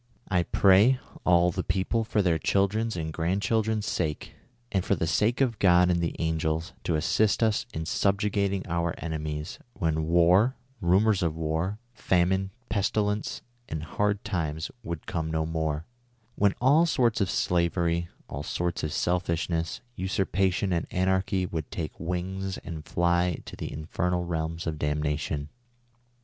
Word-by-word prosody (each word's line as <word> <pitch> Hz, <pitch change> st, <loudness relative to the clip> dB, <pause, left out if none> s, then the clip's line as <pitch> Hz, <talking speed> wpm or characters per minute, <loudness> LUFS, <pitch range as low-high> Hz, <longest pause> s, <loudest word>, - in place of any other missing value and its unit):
I 90 Hz, -2 st, +3 dB
pray, 100 Hz, +8 st, +5 dB, 0.3 s
all 90 Hz, 0 st, +5 dB
the -, -, -3 dB
people, 105 Hz, +4 st, 0 dB
for 110 Hz, -2 st, +1 dB
their 85 Hz, -3 st, +2 dB
children's 105 Hz, +5 st, +1 dB
and 80 Hz, -2 st, -3 dB
grandcliildren's 105 Hz, +6 st, 0 dB
sake; 75 Hz, -6 st, -2 dB, 0.4 s
and 95 Hz, -2 st, +1 dB
for 100 Hz, -, +1 dB
the 80 Hz, -, -1 dB
sake 105 Hz, -, +1 dB
of 120 Hz, -5 st, +1 dB
God 90 Hz, -1 st, +5 dB
and 85 Hz, -1 st, +1 dB
the 85 Hz, -, -1 dB
angels, 80 Hz, 0 st, -1 dB
to 85 Hz, -, +1 dB
assist 105 Hz, +8 st, +2 dB
us 110 Hz, +2 st, +1 dB
in 80 Hz, 0 st, -4 dB
subjugating 100 Hz, +1 st, +1 dB
our 85 Hz, -1 st, -1 dB
enemies; 75 Hz, -1 st, -4 dB
when 80 Hz, -5 st, -1 dB
war, 90 Hz, +9 st, +4 dB, 0.3 s
rumors 95 Hz, +3 st, +3 dB
of 85 Hz, -3 st, 0 dB
war, 80 Hz, +5 st, -1 dB, 0.2 s
famine, 95 Hz, -2 st, +1 dB, 0.2 s
pestilence 105 Hz, 0 st, -1 dB, 0.3 s
and 80 Hz, -1 st, -4 dB
hard 105 Hz, +6 st, -1 dB
times 80 Hz, -3 st, -2 dB
would 85 Hz, -8 st, -6 dB
come 80 Hz, -2 st, -2 dB
no 80 Hz, 0 st, 0 dB
more; 80 Hz, -1 st, -2 dB, 0.5 s
when 100 Hz, -1 st, +2 dB
all 145 Hz, +7 st, +5 dB
sorts 120 Hz, -7 st, +2 dB
of 95 Hz, -, +1 dB
slavery, 85 Hz, -1 st, +1 dB, 0.2 s
all 70 Hz, -, -5 dB
sorts 85 Hz, +3 st, -2 dB
of 75 Hz, -, -1 dB
selfishness, 85 Hz, -1 st, -1 dB
usurpation 95 Hz, 0 st, 0 dB
and 85 Hz, -, -1 dB
anarchy 95 Hz, 0 st, +1 dB
would 80 Hz, -3 st, -4 dB
take 80 Hz, -3 st, -5 dB
wings 90 Hz, +3 st, -3 dB
and 80 Hz, -2 st, -7 dB
fly 85 Hz, 0 st, +1 dB
to -, -, -8 dB
the -, -, -5 dB
infernal 85 Hz, +3 st, -2 dB
realms 80 Hz, -1 st, -3 dB
of 80 Hz, -2 st, -3 dB
damnation 75 Hz, 0 st, -1 dB
90 Hz, 145 wpm, -27 LUFS, 80-100 Hz, 0.5 s, pray